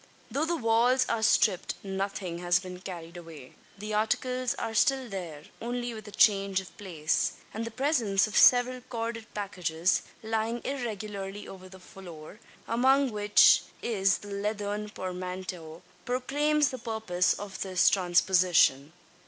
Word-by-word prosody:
Though 295 Hz, +3 st, 0 dB
the 340 Hz, +1 st, 0 dB
walls 245 Hz, +1 st, +3 dB
are 230 Hz, -1 st, 0 dB
stripped 215 Hz, -3 st, +2 dB
nothing 195 Hz, -3 st, -4 dB
has 175 Hz, 0 st, +2 dB
been 180 Hz, 0 st, -7 dB
carried 175 Hz, -2 st, -8 dB
away. 160 Hz, -6 st, -11 dB, 0.2 s
The 210 Hz, +2 st, -6 dB
articles 250 Hz, +4 st, 0 dB
are 225 Hz, -, -4 dB
still 265 Hz, +2 st, +2 dB
there, 175 Hz, -8 st, -7 dB, 0.2 s
only 240 Hz, 0 st, -3 dB
with 215 Hz, -2 st, -10 dB
a -, -, -9 dB
change 195 Hz, -2 st, +3 dB
of 190 Hz, -, -11 dB
place; 165 Hz, -6 st, -1 dB, 0.2 s
and 225 Hz, +2 st, -4 dB
the -, -, -4 dB
presence 230 Hz, -6 st, +1 dB
of 215 Hz, -, -7 dB
several 250 Hz, 0 st, +5 dB
corded 230 Hz, -2 st, -5 dB
packages, 180 Hz, -4 st, -1 dB, 0.2 s
lying 225 Hz, +2 st, -2 dB
irregularly 210 Hz, -6 st, -5 dB
over 185 Hz, -1 st, -11 dB
the 190 Hz, 0 st, -13 dB
floor 180 Hz, 0 st, -12 dB, 0.3 s
among 265 Hz, +3 st, +3 dB
which 205 Hz, -1 st, +5 dB, 0.2 s
is 195 Hz, -4 st, +1 dB
the 205 Hz, -, -12 dB
leathern 205 Hz, +1 st, -3 dB
portmanteau 180 Hz, -3 st, -6 dB, 0.2 s
proclaims 290 Hz, +4 st, +1 dB
the 260 Hz, -, -6 dB
purpose 220 Hz, -6 st, 0 dB
of 200 Hz, -1 st, -8 dB
the 190 Hz, -1 st, -5 dB
transposition. 175 Hz, -5 st, +3 dB
205 Hz, 140 wpm, -28 LUFS, 185-235 Hz, 0.3 s, several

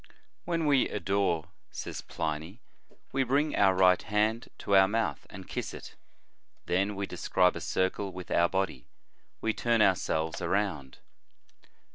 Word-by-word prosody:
"When 165 Hz, -2 st, -1 dB
we 140 Hz, -3 st, +3 dB
adore," 95 Hz, -5 st, 0 dB, 0.2 s
says -, -, -6 dB
Pliny, 80 Hz, +7 st, -4 dB, 0.3 s
" -, -, -32 dB
we 135 Hz, -, +1 dB
bring 140 Hz, +4 st, +1 dB
our 95 Hz, -2 st, +4 dB
right 90 Hz, -1 st, +5 dB
hand 110 Hz, +3 st, 0 dB
to 100 Hz, -, 0 dB
our 95 Hz, 0 st, +7 dB
mouth 105 Hz, -9 st, -2 dB
and -, -, -10 dB
kiss -, -, -4 dB
it; -, -, -10 dB, 0.7 s
then 100 Hz, +3 st, 0 dB
we 100 Hz, 0 st, -2 dB
describe 90 Hz, -1 st, +1 dB
a -, -, -5 dB
circle 95 Hz, +1 st, -1 dB
with 90 Hz, -1 st, -9 dB
our 85 Hz, 0 st, +3 dB
body, 95 Hz, -10 st, -2 dB, 0.5 s
we 110 Hz, -, 0 dB
turn 120 Hz, 0 st, +1 dB
ourselves 80 Hz, -4 st, +1 dB
around." 90 Hz, -7 st, -1 dB
95 Hz, 145 wpm, -29 LUFS, 90-110 Hz, 0.7 s, our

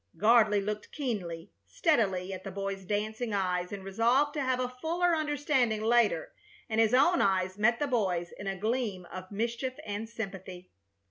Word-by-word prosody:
Gardley 215 Hz, -2 st, +5 dB
looked 210 Hz, 0 st, -4 dB
keenly, 190 Hz, -, -4 dB, 0.2 s
steadily, 195 Hz, -, +1 dB
at 185 Hz, 0 st, -7 dB
the 195 Hz, -, -5 dB
boy's 195 Hz, 0 st, -4 dB
dancing 215 Hz, +3 st, -2 dB
eyes, 180 Hz, -2 st, -1 dB
and 200 Hz, -1 st, -6 dB
resolved 235 Hz, +9 st, +2 dB
to 295 Hz, -, -2 dB
have 260 Hz, -1 st, 0 dB
a 250 Hz, 0 st, -2 dB
fuller 345 Hz, +1 st, +2 dB
understanding 290 Hz, -7 st, 0 dB
later, 240 Hz, -, +2 dB, 0.3 s
and 225 Hz, 0 st, +2 dB
his 225 Hz, +2 st, +4 dB
own 340 Hz, +7 st, +4 dB
eyes 190 Hz, 0 st, +1 dB
met 235 Hz, +3 st, +4 dB
the 290 Hz, -, 0 dB
boy's 190 Hz, -10 st, 0 dB
in 200 Hz, -, -8 dB
a 195 Hz, 0 st, -2 dB
gleam 215 Hz, -3 st, -2 dB
of 185 Hz, +1 st, -8 dB
mischief 235 Hz, +5 st, -2 dB
and 210 Hz, +2 st, -4 dB
sympathy. 190 Hz, -5 st, -7 dB
215 Hz, 165 wpm, -30 LUFS, 195-250 Hz, 0.3 s, Gardley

